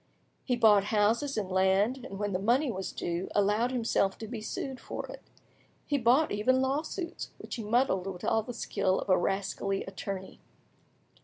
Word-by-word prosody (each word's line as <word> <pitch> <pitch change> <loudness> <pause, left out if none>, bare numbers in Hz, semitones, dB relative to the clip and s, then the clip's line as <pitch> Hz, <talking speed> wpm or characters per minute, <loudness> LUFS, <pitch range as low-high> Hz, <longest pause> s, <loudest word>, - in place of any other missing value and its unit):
He 250 - +1
bought 210 -4 +5
houses 220 +7 +1
and 195 -3 -2
land, 195 +7 +2
and 195 - -7
when 205 0 -2
the 185 - 0
money 245 +7 +2
was 190 -2 -4
due, 175 +2 -3
allowed 210 +4 +3
himself 225 -6 +1
to 220 - -7
be 225 -1 -6
sued 260 +4 -4
for - - -6
it; - - -10 0.6
he 285 - 0
bought 255 +6 +4
even 235 +6 +2
lawsuits, 305 +6 -2
which - - -9
he 225 - -4
muddled 210 -4 +1
with 180 -2 -6
all 225 - +2
the 245 - -7
skill 190 -4 0
of - - -6
a 185 - +6
rascally 195 +1 -1
attorney. 190 0 -6
215 Hz, 175 wpm, -30 LUFS, 195-250 Hz, 0.6 s, a